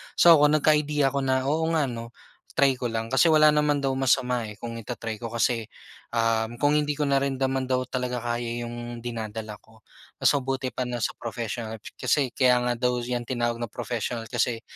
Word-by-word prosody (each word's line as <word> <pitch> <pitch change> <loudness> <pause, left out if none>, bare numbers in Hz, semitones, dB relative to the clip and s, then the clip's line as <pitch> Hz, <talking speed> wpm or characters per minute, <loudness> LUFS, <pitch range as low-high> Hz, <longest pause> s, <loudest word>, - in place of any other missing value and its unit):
So 165 -3 +7
ako 150 - +6
nagka-idea 150 -2 +2
ako 140 - -1
na, 130 -1 +1
"Oo 160 +1 0
nga 155 - +3
'no, 115 0 -8 0.4
try 135 -2 +3
ko 125 - -4
lang." 115 0 -3
Kasi 135 +5 +4
wala 155 0 +7
naman 150 -1 +2
daw 135 - +1
masama, 125 -2 +1
eh, 105 - -9
kung 115 -1 -5
i-ta-try 115 -1 -5
ko 120 - -8
kasi, 115 -1 +1 0.5
um, 115 0 +1
kung 145 +1 +4
hindi 150 0 0
ko 150 - -5
narin 135 -1 0
naman 135 0 0
daw 130 0 0
talaga 125 -2 -2
kaya 120 0 -3
yung 120 0 -6
dinadala 110 -2 -5
ko, 110 0 -23 0.4
mas - - +5
mabuti 135 -1 -2
pa 125 - -3
na 120 -1 -4
sa - - -2
professional. 115 -2 -5 0.2
Kasi 135 -4 +1
kaya 125 -2 +4
nga 125 0 0
daw 125 0 0
yan 120 0 -3
tinawag 120 -1 -1
na 120 - -3
professional, 115 +1 -4
kasi 120 -1 0
125 Hz, 195 wpm, -26 LUFS, 115-135 Hz, 0.5 s, So